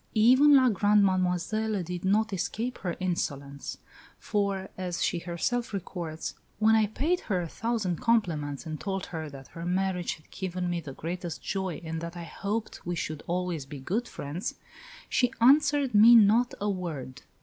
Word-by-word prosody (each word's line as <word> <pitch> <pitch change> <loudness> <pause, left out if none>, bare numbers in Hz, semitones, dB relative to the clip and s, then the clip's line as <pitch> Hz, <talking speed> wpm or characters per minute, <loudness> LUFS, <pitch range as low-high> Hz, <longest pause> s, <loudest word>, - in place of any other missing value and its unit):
Even 260 +7 +7
La 260 -2 +6
Grande 205 -1 +4
Mademoiselle 185 +3 0
did 175 +1 -5
not 210 +3 +2
escape 225 +7 -3
her 175 -3 -3
insolence; 140 -6 -3 0.4
for, 200 -2 -1
as 180 -2 -3
she 175 - 0
herself 195 +8 -2
records, 170 -4 -4 0.2
"when 220 +1 +4
I 220 -1 +4
paid 315 - 0
her 190 -3 +2
a 175 - -3
thousand 215 -3 -2
compliments 170 - 0
and 155 -1 -5
told 195 -1 -3
her 160 -3 -5
that 135 -2 -11
her 165 - -8
marriage 180 0 0
had 155 - -23
given 180 -2 -3
me 175 -1 -1
the 145 -4 -8
greatest 175 +3 -5
joy 190 -4 -3
and 160 0 -4
that 170 +1 -6
I 170 - -5
hoped 205 +6 -4
we 175 0 -2
should 155 -2 -4
always 175 -5 -2
be 140 0 -8
good 210 - -2
friends, 150 +7 -5 0.5
she 250 -2 +2
answered 285 +1 +4
me 220 +3 +9
not 230 +3 +5
a 205 - -1
word." 165 -10 -4
185 Hz, 170 wpm, -28 LUFS, 170-220 Hz, 0.5 s, me